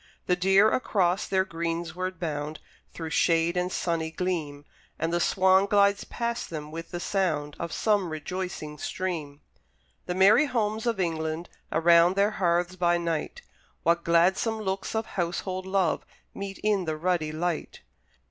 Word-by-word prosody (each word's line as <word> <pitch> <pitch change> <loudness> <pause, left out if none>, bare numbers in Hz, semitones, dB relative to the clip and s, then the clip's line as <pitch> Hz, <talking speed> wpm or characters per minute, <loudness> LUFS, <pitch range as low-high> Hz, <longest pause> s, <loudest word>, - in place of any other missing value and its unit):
The 180 - +2
deer 195 +3 +5
across 195 -5 +1
their 190 -1 +2
greensward 170 +1 -3
bound, 155 -2 -3 0.3
Through 160 -1 -6
shade 165 +1 +2
and 180 +1 0
sunny 165 -3 -1
gleam: 160 -5 -3 0.3
And 165 +2 -1
the 175 - +2
swan 190 +2 +4
glides 200 -1 +3
past 235 0 -3
them 150 -2 -6
with 165 +1 -7
the 175 - -5
sound 155 -7 -1
Of 170 -1 -4
some 205 -5 +1
rejoicing 155 -1 -5
stream. 155 -6 -4 0.7
The 180 - -2
merry 200 +10 +6
homes 220 -2 -1
of 230 -4 0
England! 160 -1 -2 0.2
Around 170 +2 +5
their 200 +2 +3
hearths 175 -2 0
by 175 -1 +2
night, 170 - -3 0.4
What 170 0 +2
gladsome 190 +7 +2
looks 195 +1 -3
of 220 0 0
household 185 +1 -3
love 190 -4 +1 0.3
Meet 195 -1 -6
in 205 -3 +2
the 155 -1 -2
ruddy 165 -2 0
light! 165 +1 -3
175 Hz, 145 wpm, -27 LUFS, 165-195 Hz, 0.7 s, merry